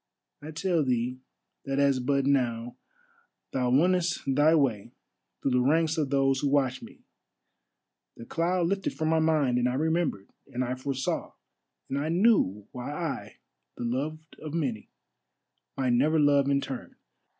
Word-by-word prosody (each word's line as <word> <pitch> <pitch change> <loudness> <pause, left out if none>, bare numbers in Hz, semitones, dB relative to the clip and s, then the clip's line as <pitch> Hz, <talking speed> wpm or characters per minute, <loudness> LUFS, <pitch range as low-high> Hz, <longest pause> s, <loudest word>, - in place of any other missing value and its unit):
I 150 - -8
tell 165 +1 0
thee 125 -1 -1 0.5
that 135 0 -2
as 140 -2 +3
but 140 +1 +1
now 120 -3 0 0.8
thou 125 -2 0
wonnest 175 +6 +2
thy 145 +4 +4
way 125 -9 0 0.5
through 135 - -1
the 125 0 +3
ranks 160 +4 +2
of 150 -4 -1
those 135 -1 +2
who 145 - 0
watch 130 -2 +1
me, - - -13 1.1
the 115 - -9
cloud 170 +4 0
lifted 195 +2 -1
from 155 -1 -1
my 160 0 +3
mind, 150 -6 +2
and 125 0 +2
I 125 - -2
remembered, 160 - 0 0.2
and 125 +1 -3
I 125 0 -2
foresaw, 130 0 -3 0.5
and 140 - -2
I 150 +2 -2
knew 165 - +2
why 125 +3 -6
I, 155 0 -4 0.4
the - - -5
loved 150 +7 -4
of 155 0 -6
many, 130 -10 -2 0.9
might 130 -2 +1
never 150 +6 +3
love 140 -1 +4
in 140 0 +2
turn. 130 -3 -7
140 Hz, 155 wpm, -28 LUFS, 125-160 Hz, 1.1 s, thy